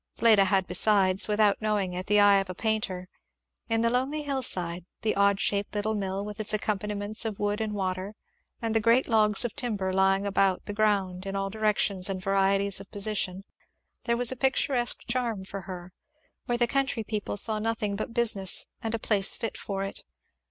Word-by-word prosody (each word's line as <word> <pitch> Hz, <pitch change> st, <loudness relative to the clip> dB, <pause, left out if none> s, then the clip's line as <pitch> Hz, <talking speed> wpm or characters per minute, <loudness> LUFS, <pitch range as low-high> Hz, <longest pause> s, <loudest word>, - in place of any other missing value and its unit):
Fleda 215 Hz, -4 st, +5 dB
had 190 Hz, 0 st, +1 dB
besides, 195 Hz, -3 st, +3 dB
without 210 Hz, -1 st, +2 dB
knowing 205 Hz, -4 st, -1 dB
it, 180 Hz, +1 st, -5 dB
the 210 Hz, 0 st, +4 dB
eye 205 Hz, -1 st, +6 dB
of 195 Hz, -1 st, -4 dB
a 185 Hz, -, -6 dB
painter. 210 Hz, -4 st, -2 dB, 0.6 s
In 225 Hz, 0 st, +1 dB
the 230 Hz, -, +3 dB
lonely 270 Hz, +5 st, -1 dB
hillside, 185 Hz, -, +1 dB, 0.2 s
the 220 Hz, -, 0 dB
odd 200 Hz, 0 st, +3 dB
shaped 200 Hz, +1 st, -1 dB
little 210 Hz, +1 st, -1 dB
mill, 195 Hz, -1 st, -3 dB
with 210 Hz, +1 st, -8 dB
its 215 Hz, 0 st, +1 dB
accompaniments 210 Hz, 0 st, -1 dB
of 220 Hz, -3 st, -4 dB
wood 205 Hz, +1 st, -2 dB
and 215 Hz, -1 st, -3 dB
water, 190 Hz, +1 st, -3 dB, 0.5 s
and 225 Hz, -1 st, -1 dB
the 225 Hz, -, +3 dB
great 230 Hz, +4 st, +3 dB
logs 215 Hz, -1 st, +3 dB
of 240 Hz, -, -4 dB
timber 210 Hz, -9 st, -2 dB
lying 195 Hz, +1 st, +2 dB
about 195 Hz, -1 st, +1 dB
the 205 Hz, -, -5 dB
ground 195 Hz, -3 st, 0 dB
in 195 Hz, -, -4 dB
all 195 Hz, 0 st, -2 dB
directions 210 Hz, -3 st, +1 dB
and 190 Hz, -1 st, -3 dB
varieties 195 Hz, +1 st, +1 dB
of 195 Hz, -, -12 dB
position, 200 Hz, -2 st, -1 dB, 0.6 s
there 235 Hz, 0 st, +1 dB
was 245 Hz, 0 st, +2 dB
a -, -, -4 dB
picturesque 265 Hz, -1 st, 0 dB
charm 235 Hz, -5 st, -2 dB
for 195 Hz, +1 st, -7 dB
her, 180 Hz, -1 st, -9 dB, 0.5 s
where 240 Hz, -1 st, 0 dB
the 240 Hz, -, +3 dB
country 270 Hz, -2 st, -1 dB
people 210 Hz, -1 st, -4 dB
saw 215 Hz, +1 st, +1 dB
nothing 220 Hz, -2 st, -2 dB
but 215 Hz, +4 st, -5 dB
business 220 Hz, -6 st, +1 dB, 0.2 s
and 225 Hz, 0 st, -2 dB
a -, -, -1 dB
place 205 Hz, -3 st, +2 dB
fit 225 Hz, -, -4 dB
for 195 Hz, -1 st, -4 dB
it. 195 Hz, -, -6 dB
205 Hz, 190 wpm, -27 LUFS, 195-225 Hz, 0.6 s, eye